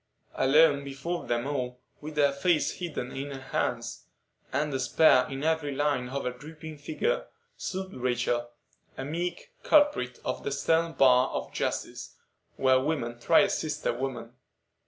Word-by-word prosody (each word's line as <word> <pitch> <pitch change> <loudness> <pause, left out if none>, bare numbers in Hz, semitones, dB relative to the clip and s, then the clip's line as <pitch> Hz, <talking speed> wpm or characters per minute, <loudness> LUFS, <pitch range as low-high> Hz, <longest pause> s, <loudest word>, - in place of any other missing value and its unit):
Alone, 140 +1 +4
before 140 +6 -4
them 120 +1 0
all, 125 -3 -3 0.2
with 150 0 -8
her 145 -1 +4
face 150 +3 +1
hidden 150 -8 -4
in 140 +2 -5
her 135 -1 -6
hands, 130 - -3 0.5
and 150 +2 0
despair 130 0 +4
in 135 +1 -5
every 160 -2 +1
line 140 -3 0
of 140 +1 -3
her 125 - 0
drooping 155 +4 -10
figure, 155 - -1 0.3
stood 190 0 -5
Rachel,—a 120 +1 -3
meek 175 - -4
culprit 290 - +3
at - - -2
the - - -3
stern 165 +4 +1
bar 130 -2 +5
of - - -5
justice, - - -3 0.4
where 130 -1 +4
women 130 -5 -2
try 165 +10 +5
a 200 - +3
sister 150 -4 -1
woman. 120 -2 -5
140 Hz, 145 wpm, -28 LUFS, 125-160 Hz, 0.5 s, bar